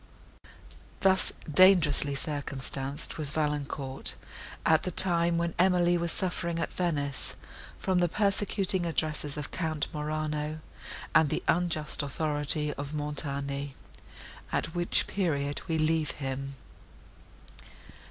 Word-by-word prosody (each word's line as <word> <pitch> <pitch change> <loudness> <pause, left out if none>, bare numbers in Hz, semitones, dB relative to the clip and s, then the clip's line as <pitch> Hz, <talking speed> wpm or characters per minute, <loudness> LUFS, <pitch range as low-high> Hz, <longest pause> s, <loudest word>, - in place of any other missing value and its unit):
Thus 190 -1 +3 0.2
dangerously 160 -6 +6
circumstanced 140 -1 -2
was 150 -2 +2
Valancourt, 145 -3 -2 0.5
at 160 -1 +5
the - - -2
time, 170 -1 +3
when 170 0 -1
Emily 175 -1 +4
was 170 -1 0
suffering 170 -2 -2
at - - -3
Venice, 145 -6 -2 0.4
from 185 -2 +1
the 175 -1 +2
persecuting 195 -2 0
addresses 155 -3 -1
of 150 - -5
Count 160 -4 -2
Morano, 150 0 -3 0.5
and 155 - +5
the - - -2
unjust 160 -4 +2
authority 150 +1 -1
of 140 +2 -6
Montoni; 140 -1 -3 0.8
at 165 - -1
which 175 0 +2
period 145 -7 -1
we 165 -2 0
leave 155 -1 +1
him. 135 0 -5
155 Hz, 110 wpm, -29 LUFS, 145-175 Hz, 0.8 s, dangerously